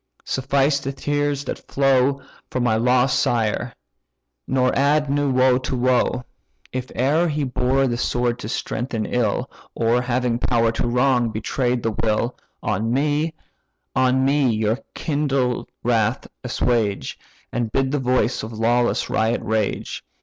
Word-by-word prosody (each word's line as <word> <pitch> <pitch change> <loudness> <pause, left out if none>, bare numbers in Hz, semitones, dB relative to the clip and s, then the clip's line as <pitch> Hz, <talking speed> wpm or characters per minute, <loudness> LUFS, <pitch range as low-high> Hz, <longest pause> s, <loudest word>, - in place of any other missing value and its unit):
suffice 140 +2 +1
the 135 0 -4
tears 145 0 -1
that - - -4
flow 135 0 +2 0.3
For 130 - -2
my 120 -3 +2
lost 125 +2 +3
sire, 120 +1 0 0.7
nor 130 -1 +2
add 145 +1 +2
new 145 0 +1
woe 130 0 +4
to 130 0 -3
woe. 125 0 +1 0.5
If 130 0 -4
e'er 150 +7 +3
he 150 -2 -1
bore 130 +1 +1
the 120 -2 -1
sword 120 -1 0
to 110 - -6
strengthen 115 -3 -3
ill, 120 +2 0 0.3
Or, 115 +1 +2
having 125 -1 0
power 115 -2 +2
to 115 - -2
wrong, 125 0 +2
betray'd 120 +3 -1
the 115 - +1
will, 110 +3 0 0.3
On 110 +4 -1
me, 150 +4 0 0.6
on 130 +1 +3
me 140 -1 +3
your 110 +1 0 0.2
kindled 140 -5 -1
wrath 115 0 +1 0.2
assuage, 115 - -1 0.3
And 120 -2 -2
bid 135 +1 +1
the 145 - 0
voice 130 -1 +1
of 110 - -6
lawless 120 +2 +1
riot 110 +1 0
rage. 110 -2 -2
125 Hz, 140 wpm, -22 LUFS, 115-135 Hz, 0.7 s, woe